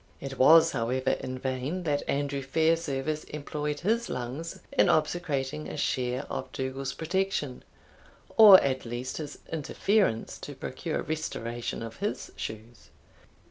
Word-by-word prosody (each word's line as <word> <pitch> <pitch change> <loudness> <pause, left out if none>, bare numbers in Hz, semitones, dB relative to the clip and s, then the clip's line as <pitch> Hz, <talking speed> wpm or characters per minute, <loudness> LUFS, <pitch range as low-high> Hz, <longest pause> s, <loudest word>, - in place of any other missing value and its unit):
It 135 -1 -7
was, 160 +4 +7
however, 130 +1 0
in 130 0 -3
vain 130 +7 -3
that 145 -3 0
Andrew 140 0 -1
Fairservice 155 0 0
employed 150 0 -4
his 230 +6 +1
lungs 130 +7 -5
in - - +4
obsecrating 150 -2 0
a - - -6
share 125 +1 0
of - - -5
Dougal's 135 +1 -3
protection, 170 -6 -2 0.7
or 205 -4 +11
at 130 -1 -1
least 120 +2 -4
his 150 -2 -6
interference 165 - 0
to - - -8
procure - - -4
restoration 120 -8 -4
of 115 0 -8
his 205 +2 -3
shoes. 110 +2 -8
140 Hz, 130 wpm, -28 LUFS, 130-160 Hz, 0.7 s, or